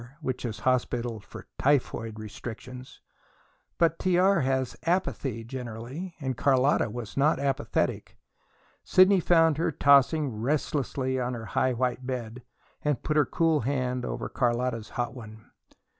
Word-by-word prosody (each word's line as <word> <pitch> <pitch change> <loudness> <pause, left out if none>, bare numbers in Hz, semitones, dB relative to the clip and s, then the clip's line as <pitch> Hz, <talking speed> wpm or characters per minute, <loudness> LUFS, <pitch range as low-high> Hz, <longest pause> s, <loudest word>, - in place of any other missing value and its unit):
which 130 -5 -3
is 110 -2 -5
hospital 120 -2 0
for 100 - -11
"typhoid 120 -5 +1
restrictions." 120 +4 -9 0.8
But 165 -1 +2
T.R. 185 +2 +3
has 130 -1 0
apathy, 145 - -1
generally, 125 +8 -7
and 130 -3 -2
Carlotta 135 -2 +3
was 115 -1 -7
not 145 +3 +3
apathetic. 140 0 -1 0.7
Sidney 185 +1 +5
found 165 -3 +4
her 170 0 +1
tossing 140 +1 +4
restlessly 130 +2 -1
on 125 0 -2
her 115 -1 -7
high 130 +5 +1
white 125 +1 -1
bed, 125 -2 -4 0.4
and 150 -4 -1
put 155 - -1
her 150 -4 +4
cool 165 -2 +2
hand 125 -1 -1
over - - -4
Carlotta's 120 -2 -1
hot 120 0 -1
one. 110 -3 -12
130 Hz, 130 wpm, -27 LUFS, 120-145 Hz, 0.8 s, Sidney